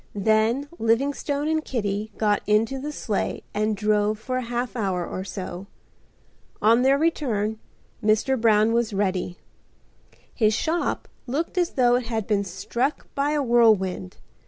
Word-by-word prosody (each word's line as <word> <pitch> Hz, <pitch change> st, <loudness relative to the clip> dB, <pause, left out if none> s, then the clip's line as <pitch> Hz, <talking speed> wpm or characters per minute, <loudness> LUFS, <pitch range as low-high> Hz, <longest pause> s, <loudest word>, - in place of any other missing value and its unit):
Then 220 Hz, +6 st, +2 dB
Livingstone 280 Hz, +5 st, 0 dB
and 315 Hz, 0 st, 0 dB
Kitty 210 Hz, -4 st, -2 dB
got 210 Hz, -2 st, +2 dB
into 225 Hz, +6 st, +2 dB
the 295 Hz, +3 st, -4 dB
sleigh 220 Hz, -8 st, -2 dB
and 215 Hz, 0 st, 0 dB
drove 210 Hz, 0 st, +1 dB
for 255 Hz, +4 st, -3 dB
a -, -, -1 dB
half 240 Hz, +1 st, -3 dB
hour 190 Hz, -6 st, -1 dB
or 185 Hz, -, -5 dB
so. 190 Hz, -1 st, -6 dB, 0.9 s
On 230 Hz, +3 st, +4 dB
their 270 Hz, +2 st, +4 dB
return 225 Hz, -9 st, 0 dB, 0.4 s
Mr. 220 Hz, +4 st, +2 dB
Brown 220 Hz, 0 st, +4 dB
was 235 Hz, -2 st, +1 dB
ready. 185 Hz, -3 st, -1 dB, 1.0 s
His 215 Hz, -3 st, +2 dB
shop 335 Hz, +6 st, -1 dB, 0.2 s
looked 295 Hz, +10 st, -2 dB
as 355 Hz, -2 st, +1 dB
though 245 Hz, -2 st, +4 dB
it 250 Hz, -2 st, -4 dB
had 225 Hz, -3 st, -2 dB
been 205 Hz, -1 st, +1 dB
struck 200 Hz, -, -3 dB
by 285 Hz, +2 st, 0 dB
a 295 Hz, -1 st, +1 dB
whirlwind. 215 Hz, -, +2 dB
225 Hz, 145 wpm, -24 LUFS, 210-265 Hz, 1.0 s, On